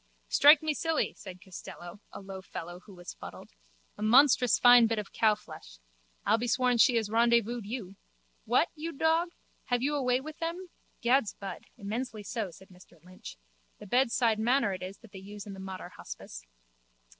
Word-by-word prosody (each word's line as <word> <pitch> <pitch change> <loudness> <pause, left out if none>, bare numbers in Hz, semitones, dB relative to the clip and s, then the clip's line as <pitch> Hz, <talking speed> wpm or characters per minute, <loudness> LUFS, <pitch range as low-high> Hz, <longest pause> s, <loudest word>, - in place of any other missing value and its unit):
Strike 295 +2 +7
me 310 -1 0
silly, 325 +1 -1
said 185 -3 -11
Costello, 175 0 -10
a - - -9
low 190 -1 -8
fellow 175 -1 -8
who 200 - -12
was 175 -1 -9
fuddled. - - -11 0.5
A - - -7
monstrous 250 +1 +5
fine 245 -1 +7
bit 225 0 -1
of 210 -2 -5
cowflesh! 215 -1 -1 0.5
I'll 225 - +3
be 245 - -2
sworn 250 0 +2
she 245 - +6
has 220 -2 0
rendezvoused 235 -1 +2
you. 205 -5 -6 0.5
What, - - +2
you 330 +2 -6
dog? 325 +4 +1 0.4
Have 245 0 0
you 290 +2 +1
a 290 - 0
way 250 -1 +2
with 310 +3 -9
them? 340 +2 -4 0.3
Gad's 240 -1 +2
bud, 195 -1 -8
immensely 220 +2 -5
so, 215 -2 -3
said 185 +3 -16
Mr 180 -2 -19
Lynch. 180 - -11 0.4
The - - -12
bedside 235 -1 +2
manner 235 -2 +2
it 185 - -6
is 185 +2 -7
that 225 - -15
they 195 - -9
use 200 +1 -9
in 205 - -8
the 195 - -10
Mater 190 -2 -7
hospice. - - -10
225 Hz, 180 wpm, -29 LUFS, 195-255 Hz, 0.5 s, Strike